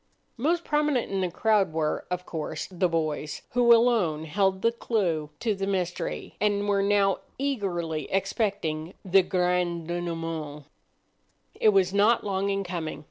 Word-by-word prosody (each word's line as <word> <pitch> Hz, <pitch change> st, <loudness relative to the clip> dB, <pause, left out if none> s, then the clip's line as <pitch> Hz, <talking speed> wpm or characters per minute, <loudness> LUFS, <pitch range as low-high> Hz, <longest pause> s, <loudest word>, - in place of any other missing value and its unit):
Most 335 Hz, +8 st, +1 dB
prominent 295 Hz, -7 st, +1 dB
in 195 Hz, -1 st, 0 dB
the 180 Hz, -, 0 dB
crowd 200 Hz, -1 st, +2 dB
were, 155 Hz, -1 st, -1 dB
of 180 Hz, 0 st, -3 dB
course, 160 Hz, -3 st, -4 dB
the 180 Hz, 0 st, +1 dB
boys, 155 Hz, -2 st, -2 dB
who 240 Hz, -1 st, +4 dB
alone 225 Hz, -10 st, +4 dB
held 190 Hz, +3 st, 0 dB
the 230 Hz, -, +4 dB
clue 180 Hz, -10 st, -1 dB
to 225 Hz, -3 st, +1 dB
the 195 Hz, 0 st, -3 dB
mystery, 185 Hz, -3 st, -3 dB
and 205 Hz, -1 st, +1 dB
were 200 Hz, -1 st, +2 dB
now 200 Hz, -1 st, +2 dB, 0.2 s
eagerly 175 Hz, -, -2 dB
expecting 195 Hz, -5 st, -1 dB
the 190 Hz, +1 st, +5 dB
grand 180 Hz, -2 st, 0 dB
denouement. 165 Hz, -4 st, -4 dB, 0.9 s
It 215 Hz, -, +3 dB
was 195 Hz, -2 st, +3 dB
not 210 Hz, +4 st, +4 dB
long 195 Hz, -1 st, -1 dB
in 195 Hz, 0 st, 0 dB
coming. 175 Hz, -4 st, -4 dB
190 Hz, 145 wpm, -27 LUFS, 165-205 Hz, 0.9 s, the